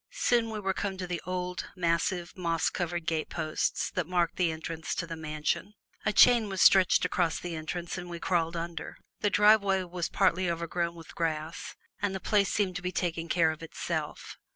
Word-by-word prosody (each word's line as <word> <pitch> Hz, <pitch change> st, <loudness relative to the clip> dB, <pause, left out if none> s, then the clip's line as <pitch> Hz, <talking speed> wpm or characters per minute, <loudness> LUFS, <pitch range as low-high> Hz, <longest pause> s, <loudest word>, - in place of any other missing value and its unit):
Soon 240 Hz, -, +2 dB
we 205 Hz, -3 st, -2 dB
came 195 Hz, 0 st, -3 dB
to 185 Hz, -, -4 dB
the 175 Hz, -1 st, -3 dB
old, 180 Hz, 0 st, -3 dB
massive, 175 Hz, 0 st, 0 dB
moss 170 Hz, -3 st, 0 dB
covered 175 Hz, -1 st, -3 dB
gateposts 155 Hz, 0 st, -1 dB
that 180 Hz, -5 st, -2 dB
marked 175 Hz, -1 st, +1 dB
the 175 Hz, -3 st, +2 dB
entrance 160 Hz, +1 st, -4 dB
to 170 Hz, -, -2 dB
the 165 Hz, 0 st, -6 dB
mansion. 155 Hz, +6 st, -2 dB, 0.3 s
A -, -, +4 dB
chain 235 Hz, -1 st, +6 dB
was 190 Hz, -1 st, -4 dB
stretched 185 Hz, -1 st, +6 dB
across 175 Hz, -2 st, 0 dB
the 175 Hz, -2 st, -5 dB
entrance 170 Hz, +3 st, -4 dB
and 175 Hz, 0 st, -8 dB
we 170 Hz, -, -5 dB
crawled 170 Hz, -2 st, 0 dB
under. 165 Hz, -1 st, -5 dB, 0.2 s
The 205 Hz, -, +2 dB
driveway 200 Hz, -2 st, +4 dB
was 175 Hz, -1 st, -3 dB
partly 185 Hz, -2 st, +2 dB
overgrown 170 Hz, 0 st, -2 dB
with 165 Hz, -1 st, -12 dB
grass, 160 Hz, 0 st, -3 dB, 0.3 s
and 200 Hz, -1 st, 0 dB
the -, -, -3 dB
place 200 Hz, 0 st, +2 dB
seemed 190 Hz, -3 st, 0 dB
to -, -, -6 dB
be 180 Hz, 0 st, -2 dB
taking 170 Hz, -2 st, -2 dB
care 165 Hz, -2 st, +3 dB
of 155 Hz, -, -8 dB
itself. 165 Hz, -, -5 dB
175 Hz, 185 wpm, -29 LUFS, 165-190 Hz, 0.3 s, chain